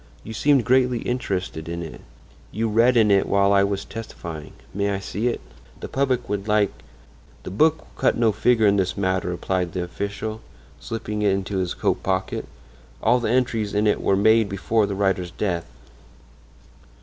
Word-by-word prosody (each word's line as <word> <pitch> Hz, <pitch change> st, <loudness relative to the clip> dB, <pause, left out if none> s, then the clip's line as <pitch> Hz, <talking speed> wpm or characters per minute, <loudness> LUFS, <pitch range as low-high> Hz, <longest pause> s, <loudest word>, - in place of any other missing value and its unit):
You 110 Hz, -, -7 dB
seemed 140 Hz, +2 st, +3 dB
greatly 125 Hz, -1 st, +3 dB
interested 95 Hz, -9 st, -3 dB
in 85 Hz, 0 st, -4 dB
it; 80 Hz, -, -9 dB, 0.5 s
you 115 Hz, +2 st, -1 dB
read 115 Hz, +3 st, +4 dB
in 110 Hz, -2 st, +5 dB
it 100 Hz, -1 st, +3 dB
while 100 Hz, 0 st, +3 dB
I 100 Hz, 0 st, +5 dB
was 100 Hz, 0 st, -1 dB
testifying. 85 Hz, -8 st, -8 dB, 0.2 s
May 100 Hz, +1 st, 0 dB
I 100 Hz, -, 0 dB
see 100 Hz, +4 st, -3 dB
it? 120 Hz, -, -1 dB, 0.4 s
The -, -, -6 dB
public 130 Hz, -3 st, 0 dB
would 100 Hz, 0 st, -3 dB
like—" 105 Hz, -2 st, +3 dB, 0.7 s
"The -, -, -6 dB
book 155 Hz, +10 st, +3 dB
will -, -, -21 dB
cut -, -, +3 dB
no 115 Hz, -2 st, +3 dB
figure 110 Hz, +2 st, +3 dB
in 100 Hz, 0 st, +4 dB
this 95 Hz, 0 st, 0 dB
matter," 95 Hz, -2 st, 0 dB
replied 90 Hz, 0 st, -2 dB
the 90 Hz, -, -2 dB
official, 100 Hz, +4 st, -5 dB, 0.4 s
slipping 105 Hz, -2 st, -4 dB
it 105 Hz, -, +3 dB
into 95 Hz, 0 st, -1 dB
his 90 Hz, -2 st, -2 dB
coat -, -, 0 dB
pocket; 95 Hz, 0 st, -2 dB, 0.6 s
"all 120 Hz, +3 st, +4 dB
the 115 Hz, -, -1 dB
entries 115 Hz, -4 st, 0 dB
in 105 Hz, +1 st, +2 dB
it 105 Hz, -, +2 dB
were 100 Hz, -, +2 dB
made 110 Hz, +1 st, +4 dB
before 105 Hz, +2 st, +1 dB
the 100 Hz, -, -3 dB
writer's 95 Hz, -3 st, 0 dB
death." 90 Hz, -3 st, -2 dB
100 Hz, 180 wpm, -23 LUFS, 95-115 Hz, 0.7 s, in